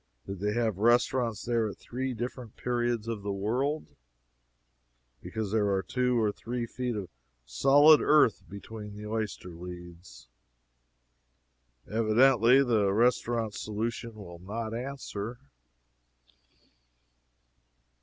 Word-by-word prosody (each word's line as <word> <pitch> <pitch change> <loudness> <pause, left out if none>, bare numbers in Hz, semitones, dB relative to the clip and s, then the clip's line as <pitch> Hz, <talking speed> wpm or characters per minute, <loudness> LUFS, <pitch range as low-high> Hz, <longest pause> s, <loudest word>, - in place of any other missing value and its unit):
Did 100 -1 -6
they 105 +2 -1
have 110 -4 0
restaurants 120 0 +2
there 115 -2 +1
at - - -9
three 130 +1 -4
different 120 0 -6
periods 120 -2 -1
of 115 -3 -3
the 100 0 -3
world? 125 +10 -2 1.3
because 110 -3 -4
there 105 -2 +2
are 95 -1 0
two 125 +5 0
or 110 -2 +2
three 120 +3 -4
feet 125 0 -3
of 100 -3 -4 0.4
solid 145 - +6
earth 150 -7 +4
between 105 +1 -9
the 105 +1 -8
oyster 105 -4 -4
leads. 85 -5 -11 1.6
Evidently, 115 +3 +4
the 110 -6 +2
restaurant 115 0 +1
solution 115 +2 -4
will 85 -5 -10
not 110 +4 -5
answer. 120 -3 -5
115 Hz, 110 wpm, -29 LUFS, 100-120 Hz, 1.6 s, solid